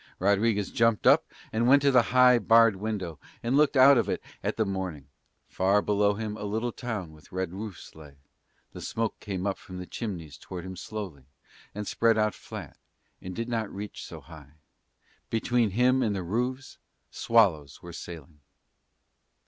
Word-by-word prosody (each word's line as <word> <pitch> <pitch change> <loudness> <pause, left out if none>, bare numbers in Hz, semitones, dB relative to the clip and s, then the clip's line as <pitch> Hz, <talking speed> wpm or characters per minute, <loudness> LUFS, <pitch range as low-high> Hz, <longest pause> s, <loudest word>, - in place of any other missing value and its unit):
Rodriguez 100 +1 +1
jumped 115 -2 +2
up - - +5 0.3
and 115 +2 +1
went 140 +2 +6
to 140 - +5
the 125 -2 +6
high, 125 -1 +6
barred 115 -1 +5
window 95 -6 -4 0.2
and 120 +3 +1
looked 150 -1 +3
out 135 0 +8
of - - -1
it - - -1 0.2
at - - -2
the 110 - +2
morning: 95 -7 -4 0.4
far 95 +2 +2
below 105 0 +2
him 105 0 -4
a - - -7
little 110 +4 -2
town 110 -10 -5
with 75 0 -18
red 95 -1 -3
roofs 100 -1 -8
lay; 75 -3 -14 0.6
the - - -8
smoke 115 -1 -3
came 95 -2 -4
up 100 -1 -1
from 95 - -10
the 90 - -6
chimneys 85 - -6
toward 90 -1 -8
him 95 0 -7
slowly, 95 -8 -7 0.5
and 105 -1 -5
spread 115 -1 +2
out 105 -2 +2
flat - - -10 0.4
and 90 0 -7
did 115 0 -3
not 115 -3 -2
reach 100 +1 -7
so 80 -2 -9
high. 75 -1 -14 0.8
Between 115 0 +1
him 125 +6 +3
and 105 -4 0
the 95 - -3
roofs 125 +8 -3 0.3
swallows 90 -11 +2
were 85 -1 -9
sailing. 80 -3 -9
105 Hz, 175 wpm, -27 LUFS, 90-115 Hz, 0.8 s, out